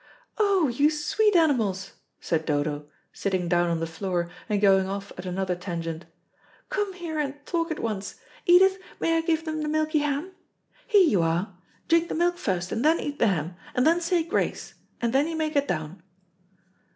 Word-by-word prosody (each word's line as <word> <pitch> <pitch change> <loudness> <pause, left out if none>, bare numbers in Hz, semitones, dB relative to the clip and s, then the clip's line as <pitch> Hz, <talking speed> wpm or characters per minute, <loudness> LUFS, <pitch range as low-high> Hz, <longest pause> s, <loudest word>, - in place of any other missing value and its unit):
"Oh, 395 -6 +3
you 280 +5 +3
sweet 380 +7 +1
animals," 225 - +2 0.3
said 160 -1 -1
Dodo, 145 -1 -1 0.3
sitting 185 -3 -1
down 175 0 +2
on 165 -1 0
the 165 - -1
floor 175 +1 -3 0.2
and 210 -1 +1
going 195 -2 +4
off 200 0 -5
at 180 +1 -7
another 185 0 -1
tangent. 170 -2 -5 0.6
"Come 410 -1 -1
here 335 -4 -5
and 285 -2 -1
talk 335 -1 -1
at 320 - -3
once. 210 -3 -4 0.3
Edith, 380 +2 +6 0.2
may 330 - +1
I 325 - +2
give 325 -1 0
them 310 -1 -3
the 300 - -2
milky 310 0 +1
ham? 295 +5 -2 0.6
Here 410 -6 +6
you 200 - +3
are; 170 +4 -1 0.3
drink 335 +1 +3
the - - -2
milk 345 +1 +1
first, 180 -3 -2
and 225 - -1
then 320 +2 +4
eat 290 0 -4
the 230 - +4
ham, 175 -3 -1 0.2
and 250 - +3
then 335 +2 +4
say 340 0 +1
grace, 335 - -2 0.3
and 235 0 -1
then 280 +3 +3
you 330 - -3
may 315 -1 -1
get 285 -2 +1
down." 155 +1 -4
265 Hz, 190 wpm, -26 LUFS, -, 0.6 s, Edith